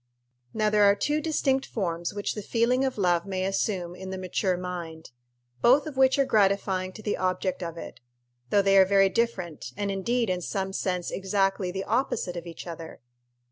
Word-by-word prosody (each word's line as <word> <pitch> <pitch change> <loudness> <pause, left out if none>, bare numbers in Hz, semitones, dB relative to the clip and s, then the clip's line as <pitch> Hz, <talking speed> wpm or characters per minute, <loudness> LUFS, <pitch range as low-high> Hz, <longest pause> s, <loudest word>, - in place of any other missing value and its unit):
_ - - -50 0.5
Now 215 -1 +1
there 210 -1 +5
are 200 0 +6
two 300 +7 0
distinct 275 -4 +1
forms 175 -5 -2
which 205 0 -3
the 210 - -5
feeling 235 +5 +1
of 260 -3 -1
love 175 -4 +2
may 190 -1 -2
assume 190 -2 -1
in 190 +1 -8
the 190 - -4
mature 185 0 -1
mind, 170 -4 -6 0.5
both 270 +5 +5
of 305 -3 -6
which 265 0 +4
are 275 - +3
gratifying 195 -4 +1
to 215 - -11
the 205 - -1
object 185 0 -1
of 170 -1 -5
it, - - -9 0.5
though 200 - +3
they 195 0 +5
are 190 - +7
very 195 0 +4
different, 180 - -2
and 200 -1 -1
indeed 230 +5 0
in 180 -1 -1
some 190 +1 -3
sense 180 -2 -2
exactly 195 -1 0
the 190 +2 -3
opposite 220 -6 -1
of 175 0 -6
each 165 - -8
other. 165 -2 -8
195 Hz, 195 wpm, -27 LUFS, 180-215 Hz, 0.5 s, are